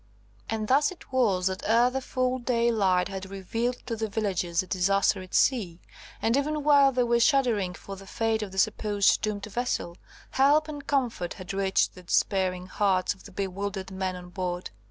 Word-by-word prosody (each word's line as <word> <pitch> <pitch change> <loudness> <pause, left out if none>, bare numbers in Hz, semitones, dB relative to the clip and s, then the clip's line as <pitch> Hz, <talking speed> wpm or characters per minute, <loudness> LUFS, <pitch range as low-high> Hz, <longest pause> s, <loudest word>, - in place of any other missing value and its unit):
And 220 -1 -2
thus 280 +4 +4
it 360 - -14
was 205 -8 +2
that 190 0 -1
ere 235 +3 +3
the 265 +1 -2
full 255 0 -1
daylight 230 -7 +2
had 190 -1 -7
revealed 225 +6 -2
to 235 -2 -3
the 220 0 -3
villagers 190 -5 -1
the - - -8
disaster 195 +1 +1
at 185 - -8
sea, 195 -10 +2 0.4
and 230 +2 +3
even 300 +2 -1
while 285 -2 +6
they 250 -1 +1
were 235 0 +2
shuddering 230 - +2
for 195 - -9
the 195 0 -13
fate 225 +1 -1
of 205 -3 -5
the 190 - -10
supposed 205 0 +2
doomed 210 -2 -2
vessel, 215 -5 -3 0.3
help 290 +3 +4
and 290 -2 -8
comfort 240 -11 -1
had 185 0 -7
reached 195 -1 +1
the 180 - -12
despairing 185 0 0
hearts 190 -1 +1
of - - -20
the 200 - -11
bewildered 195 0 -4
men 190 -1 -3
on 180 0 -10
board. 180 -1 -4
205 Hz, 185 wpm, -27 LUFS, 190-245 Hz, 0.4 s, while